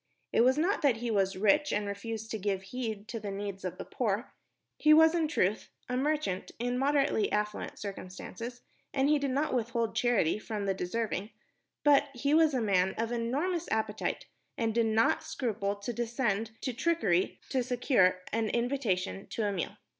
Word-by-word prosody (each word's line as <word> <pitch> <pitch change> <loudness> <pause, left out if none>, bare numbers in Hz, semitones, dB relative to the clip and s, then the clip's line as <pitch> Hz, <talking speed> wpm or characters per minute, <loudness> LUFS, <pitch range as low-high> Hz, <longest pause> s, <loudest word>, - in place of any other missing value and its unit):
It - - +5
was 260 +3 +4
not 350 +4 +1
that 275 -7 +3
he 235 0 -2
was 195 -2 +1
rich 290 +10 +3
and 205 0 0
refused 220 +2 -5
to 220 - -3
give 195 -1 -1
heed 220 -1 -5
to 230 - -4
the 205 -1 -5
needs 200 -1 -5
of 185 - -4
the - - -6
poor. 225 -1 -2 0.5
He 305 0 +7
was, 320 +1 +7
in 330 -2 +1
truth, 210 - 0 0.2
a 250 - -2
merchant 290 -8 -1
in 245 +1 -1
moderately 275 -5 +2
affluent 210 0 -2
circumstances, 210 +5 -7 0.3
and 270 +1 +3
he 300 -1 +4
did 280 -1 -1
not 280 +3 0
withhold 235 -1 -1
charity 225 -7 +2
from 215 -2 -4
the 195 - +1
deserving; 205 +2 -2 0.5
but 285 -1 +5
he 280 +4 0
was 315 -2 +5
a 250 - +1
man 190 -3 +2
of 230 +1 -1
enormous 290 +10 -1
appetite 220 -1 -1 0.3
and 225 -3 0
did 230 0 +2
not 220 +1 +3
scruple 205 -5 -2
to 205 +4 -5
descend 230 -2 -1
to 255 - -2
trickery 230 - +1
to 260 - +1
secure 240 -7 +2
an 225 -1 +1
invitation 235 -7 -1
to 225 - -3
a 205 - +1
meal. 185 -4 -3
230 Hz, 180 wpm, -30 LUFS, 205-265 Hz, 0.5 s, He